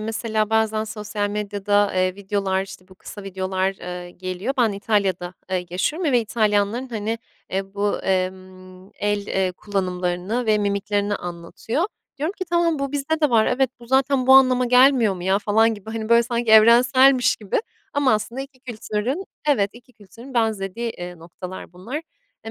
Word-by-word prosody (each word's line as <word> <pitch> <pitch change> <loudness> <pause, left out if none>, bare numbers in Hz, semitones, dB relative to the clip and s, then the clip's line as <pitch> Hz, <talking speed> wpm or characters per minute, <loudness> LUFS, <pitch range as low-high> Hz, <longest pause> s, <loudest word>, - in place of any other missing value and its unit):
mesela 220 0 -1
bazen 220 -1 +1
sosyal 210 -1 -3
medyada, 205 0 0
eee, 185 0 +1
videolar, 195 -1 -1
işte, 185 -1 -11
bu 190 - -16
kısa 205 +2 -10
videolar, 190 0 -2
eee, 180 0 -7
geliyor. 185 +8 -4
Ben 230 -4 +3
İtalya'da, 195 -4 -1 0.2
eee, 180 -1 -1
yaşıyorum 295 - 0
ve 245 - +4
İtalyanların, 215 +2 0
hani, 225 -1 -3 0.3
eee, 195 +1 -3
bu, 205 0 0
emm, 185 0 -4
el, 205 0 -1
eee, 190 -1 0
kullanımlarını 185 +3 -2
ve 215 -1 +3
mimiklerini 205 0 0
anlatıyor. 175 - -4 0.3
Diyorum 310 +5 -1
ki, 370 - -2
"Tamam, 340 -2 +1
bu 275 0 -3
bizde 300 +3 -1
de 300 -4 +3
var. 220 -2 +4
Evet, 260 0 +1
bu 235 - -13
zaten 265 0 +2
bu 265 - +7
anlama 255 -1 +5
gelmiyor 250 -4 +5
mu, 180 - -8
ya?" 190 +2 +2
falan 220 +2 +3
gibi, 210 +1 -10
hani, 220 -1 -4
böyle, 235 0 +6
sanki 235 -1 -1
evrenselmiş 245 +4 +6
gibi 210 - -1 0.3
ama 285 -5 +2
aslında 235 +5 -2
iki 270 -1 -10
kültürün 245 - -3 0.2
Evet, 205 -8 +3
iki 245 +1 -17
kültürün 230 +5 -14
benzediği, 225 0 -1
eee, 175 -3 -8
noktalar 180 +2 -9
bunlar. 190 +11 -7 0.5
Eee, 225 - -6
210 Hz, 165 wpm, -22 LUFS, 190-245 Hz, 0.5 s, bu